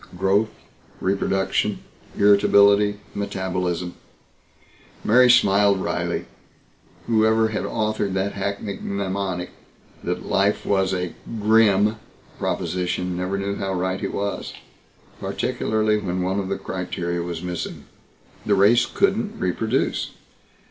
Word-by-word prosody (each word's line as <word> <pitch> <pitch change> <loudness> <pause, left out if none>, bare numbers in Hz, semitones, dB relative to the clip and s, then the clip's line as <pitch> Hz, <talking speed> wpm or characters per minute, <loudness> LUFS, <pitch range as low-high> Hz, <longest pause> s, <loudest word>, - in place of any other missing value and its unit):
Growth, 100 +4 +2 0.5
reproduction, 95 0 0 0.3
irritability, 100 0 +5
metabolism 90 -3 -2 1.1
Mary 125 +3 +5
smiled 100 -4 +5
wryly. - - -2 0.8
Whoever 110 0 +3
had 105 -3 -2
authored 105 -2 -1
that 95 +1 0
hackneyed 100 0 -4
mnemonic 95 -2 -3 0.5
that - - -3
life 100 +1 +1
was 95 -1 +2
a 90 -2 -2 0.3
"grim" 105 0 +4 0.4
proposition 90 +1 -2
never 90 +2 -2
knew 100 0 -2
how 95 -1 -2
right 95 +1 -1
he - - -1
was, 100 0 -3 0.7
particularly 110 -1 0
when 90 -2 -2
one 95 +2 0
of 95 -1 -3
the 100 - -1
criteria 85 -2 -3
was 85 -1 -5
missing. 90 -1 -5 0.6
The 105 - +2
race 105 +5 +5
couldn't 205 +2 0
reproduce. 110 +7 0
100 Hz, 105 wpm, -23 LUFS, 95-105 Hz, 1.1 s, irritability